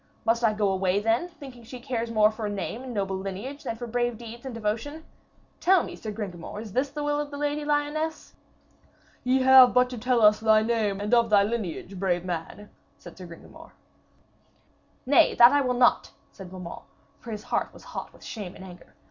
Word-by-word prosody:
Must 235 +1 +1
I 220 -2 +3
go 210 -2 +1
away 190 0 +1
then, 225 +10 +1
thinking 270 -8 -12
she 250 +2 -10
cares 240 -2 -3
more 215 -1 +4
for 215 -1 -5
a - - -3
name 205 +4 -4
and 260 -1 -7
noble 195 -4 -2
lineage 200 +10 -6
than 225 - -4
for 240 +2 -7
brave 240 0 -1
deeds 235 +2 -10
and 250 - -6
devotion? 230 +9 -4 0.5
Tell 375 -1 +4
me, - - -7
Sir 220 - -7
Gringamor, 200 -3 -7
is 215 -3 -9
this 265 +4 0
the 295 +1 -5
will 295 0 0
of 295 -1 -3
the 285 - -7
Lady 295 +1 -2
Lyones?' 295 +2 -2 0.9
'Ye 255 +1 +2
have 260 -1 +8
but 250 0 +4
to 245 - -6
tell 245 0 +1
us 210 0 +6
thy 220 -1 +4
name 220 -4 0
and 210 +3 -2
of 235 -1 +4
thy 205 -2 +5
lineage, 200 -3 -4
brave 180 -2 0
man,' 180 +4 -6 0.3
said 175 - -13
Sir 185 -2 -10
Gringamor. 170 -1 -14 1.3
'Nay, 270 +1 +4
that 240 +1 +8
I 285 0 +3
will 250 -2 0
not!' 245 0 +3 0.2
said 190 -2 -11
Beaumains, 180 -2 -8 0.4
for 235 - -11
his 210 -1 -6
heart - - -2
was - - -16
hot - - -7
with - - -19
shame 200 -5 -7
and - - -11
anger. 180 -1 -14
230 Hz, 205 wpm, -26 LUFS, 205-255 Hz, 1.3 s, have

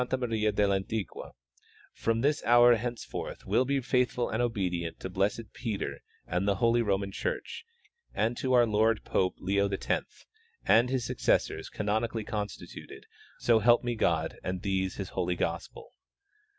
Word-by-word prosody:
Maria 110 -4 0
del 100 -1 +2
Antiqua, 95 +1 -4 0.6
from 115 0 0
this 145 +3 +1
hour 120 +1 +7
henceforth 120 +1 -5
will 130 - +2
be 140 +1 +1
faithful 125 -1 0
and 110 - 0
obedient 90 -8 -2
to 95 - -6
blessed 100 +4 -1
Peter 110 -5 -4 0.3
and 90 +3 -1
the 100 - +3
holy 115 +4 +3
Roman 100 -2 0
church 465 - -4 0.5
and 115 +2 0
to 130 -1 0
our 120 -1 +6
Lord 110 0 +2
Pope 90 -1 0
Leo 100 +1 +1
X 95 - -3 0.4
and 120 +2 +5
his 130 -3 -1
successors - - 0
canonically 110 +2 -1
constituted, 105 -1 -6 0.3
so 115 -2 +3
help 120 +3 +4
me 120 0 -1
God 115 - 0
and 95 +1 -3
these 95 -2 -1
His 95 -2 -5
holy 90 -1 -1
gospel. 85 - -4
110 Hz, 150 wpm, -29 LUFS, 100-120 Hz, 0.6 s, hour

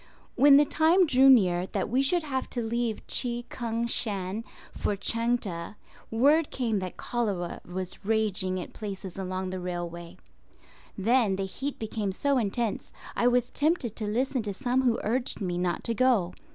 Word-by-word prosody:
When 280 +2 +7
the 295 - +5
time 330 +5 +4
drew 270 -3 +5
near 185 -8 +4
that - - -2
we 250 +5 +2
should 335 +5 +1
have 265 -4 -3
to 240 - -3
leave 230 -1 -2
Chi 240 -1 0
Kung 230 -1 -2
Shan 205 -3 -1 0.3
for 205 - -1
Chang 230 +4 +1
teh, 170 -5 -6 0.4
word 285 +7 +3
came 230 -5 -1
that 185 -1 -6
cholera 205 -8 -2
was 185 +1 -5
raging 195 -3 0
at 180 - -8
places 195 -3 -7
along 185 0 -3
the 185 - -4
railway. 175 -1 -6 0.8
Then 225 0 +2
the 195 0 -2
heat 265 +9 -5
became 215 -2 -3
so 275 +7 +1
intense 220 0 -2 0.2
I 240 - +2
was 245 0 +2
tempted 290 - 0
to 215 - -3
listen 255 +4 0
to 205 -2 -4
some 255 +2 +1
who 245 -3 +2
urged 245 +4 -1
me 180 -4 -2
not 180 -1 -1
to 230 - 0
go. 225 -7 +2
225 Hz, 170 wpm, -28 LUFS, 190-255 Hz, 0.8 s, When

